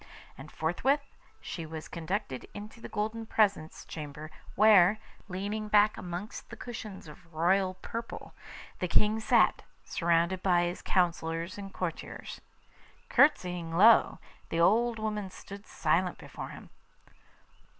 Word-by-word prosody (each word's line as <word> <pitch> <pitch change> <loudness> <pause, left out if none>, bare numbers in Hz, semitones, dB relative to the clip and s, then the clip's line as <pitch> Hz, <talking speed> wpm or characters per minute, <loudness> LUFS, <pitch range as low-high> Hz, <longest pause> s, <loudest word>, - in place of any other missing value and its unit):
And 135 +3 -11
forthwith 265 - 0 0.3
she 170 - -6
was 160 0 -7
conducted 170 - -4
into 210 +2 -9
the - - -8
golden 220 +2 -3
presence 200 -8 +1
chamber, 150 0 -8 0.2
where, 205 -1 +6 0.3
leaning 205 +3 -3
back 210 0 +4
amongst 180 +4 -7
cushions 215 -7 -8
of 165 +3 -14
royal 185 +4 +2
purple, 230 0 -6 0.5
the 180 - -1
King 210 +5 +3
sat, 220 - +3 0.2
surrounded 170 +2 +1
by 175 -2 +3
his 175 +1 -3
counsellors 170 -1 0
and 195 -1 -7
courtiers. 175 -4 -6 0.7
Courtesying 180 - +2
low, 220 +4 +6 0.3
the 165 - -1
old 225 +7 +3
woman 210 -2 -3
stood 200 +2 -11
silent 170 +3 0
before - - -8
him. - - -12
185 Hz, 120 wpm, -30 LUFS, 170-215 Hz, 0.7 s, where